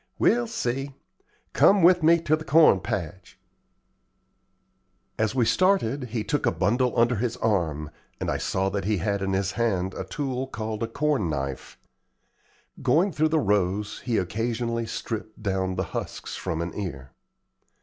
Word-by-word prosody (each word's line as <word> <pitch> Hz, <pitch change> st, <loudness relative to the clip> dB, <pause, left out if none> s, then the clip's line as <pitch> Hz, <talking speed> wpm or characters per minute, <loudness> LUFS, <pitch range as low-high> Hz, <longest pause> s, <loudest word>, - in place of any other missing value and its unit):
"We'll 240 Hz, 0 st, +3 dB
see. 135 Hz, -, -3 dB, 0.6 s
Come 195 Hz, -2 st, +5 dB
with 180 Hz, +1 st, +6 dB
me 165 Hz, +2 st, +5 dB
to 155 Hz, -1 st, +2 dB
the 155 Hz, -, -7 dB
corn 155 Hz, -9 st, +5 dB
patch." 95 Hz, -2 st, -5 dB, 1.8 s
As 110 Hz, +2 st, 0 dB
we 125 Hz, -3 st, +3 dB
started 145 Hz, -, +2 dB
he 115 Hz, -2 st, -3 dB
took 145 Hz, -, -1 dB
a -, -, +4 dB
bundle 110 Hz, +9 st, +1 dB
under 120 Hz, 0 st, +3 dB
his 120 Hz, +2 st, -2 dB
arm, 80 Hz, -10 st, -1 dB, 0.3 s
and -, -, -1 dB
I -, -, 0 dB
saw 95 Hz, +1 st, 0 dB
that 100 Hz, -1 st, -3 dB
he 105 Hz, 0 st, +1 dB
had 100 Hz, +2 st, -1 dB
in 95 Hz, 0 st, -1 dB
his 95 Hz, 0 st, 0 dB
hand 95 Hz, -5 st, -1 dB
a -, -, -4 dB
tool 130 Hz, +6 st, -3 dB
called 110 Hz, -3 st, -5 dB
a 115 Hz, -, 0 dB
corn 135 Hz, -, 0 dB
knife. 70 Hz, -3 st, -4 dB, 1.0 s
Going 185 Hz, +6 st, +3 dB
through 155 Hz, 0 st, +1 dB
the 160 Hz, 0 st, +2 dB
rows 100 Hz, -3 st, 0 dB
he 120 Hz, -3 st, -1 dB
occasionally 115 Hz, +4 st, -2 dB
stripped 110 Hz, -1 st, -6 dB
down 95 Hz, -2 st, -1 dB
the 95 Hz, -, -1 dB
husks -, -, -5 dB
from 80 Hz, 0 st, -3 dB
an 85 Hz, -, -5 dB
ear. 70 Hz, -10 st, -6 dB
110 Hz, 160 wpm, -25 LUFS, 95-135 Hz, 1.8 s, with